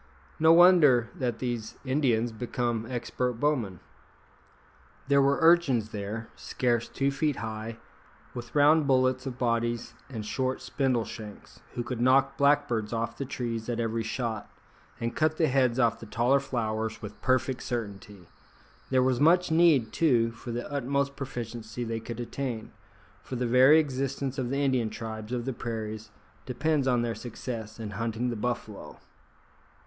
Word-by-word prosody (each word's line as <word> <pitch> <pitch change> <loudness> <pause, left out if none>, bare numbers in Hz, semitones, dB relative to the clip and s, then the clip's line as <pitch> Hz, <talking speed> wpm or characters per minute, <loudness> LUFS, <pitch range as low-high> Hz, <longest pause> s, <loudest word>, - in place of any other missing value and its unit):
No 160 +1 +6
wonder 165 -9 +6
that 120 -3 -2
these 120 -3 -4
Indians 125 -4 +1
become 120 0 -2
expert 125 0 -2
bowmen. 115 - -1 1.3
There 140 0 +5
were 140 +1 +3
urchins 160 -10 +4
there, 105 +2 -5
scarce 120 -2 -1
two 140 0 0
feet 145 +1 0
high, 110 0 -5 0.6
with 120 +2 -8
round 150 +1 +5
bullets 130 0 +2
of 125 -2 -5
bodies 120 -1 -1 0.2
and 110 -5 -6
short 130 +3 -1
spindle 130 -5 0
shanks, 105 -3 -10 0.2
who 120 - -2
could 120 -1 -4
knock 135 +2 +4
blackbirds 140 -7 +2
off 115 0 -2
the 140 - -4
trees 120 -3 -4
at 120 -1 -2
every 115 0 -1
shot, 110 -1 -3 0.5
and 115 0 -3
cut 155 0 +1
the 165 - +3
heads 130 -4 +2
off 115 -3 +2
the 115 - -10
taller 120 +6 +2
flowers 110 -4 -3
with 105 0 -9
perfect 130 0 +1
certainty! 100 -5 -6 0.6
There 130 -1 +3
was 130 -1 +1
much 175 +4 +4
need, 160 -9 +4
too, 120 -8 +3
for 120 +1 -11
the 120 +1 -4
utmost 140 0 -1
proficiency 120 -3 -6
they 115 -1 -3
could 115 +1 -7
attain, 120 -2 -4 0.5
for 130 - -7
the 125 0 -1
very 130 +5 +6
existence 135 -2 -1
of 125 -2 -2
the 135 - -1
Indian 130 -5 +1
tribes 110 0 -7
of 120 -1 -2
the 135 - -2
prairies 110 -2 -5 0.4
depends 140 +2 0
on 120 -2 +2
their 115 -1 -1
success 115 -2 -7
in 110 -2 -5
hunting 115 +3 -2
the - - -3
buffalo. 110 -2 -5
120 Hz, 155 wpm, -28 LUFS, 115-135 Hz, 1.3 s, No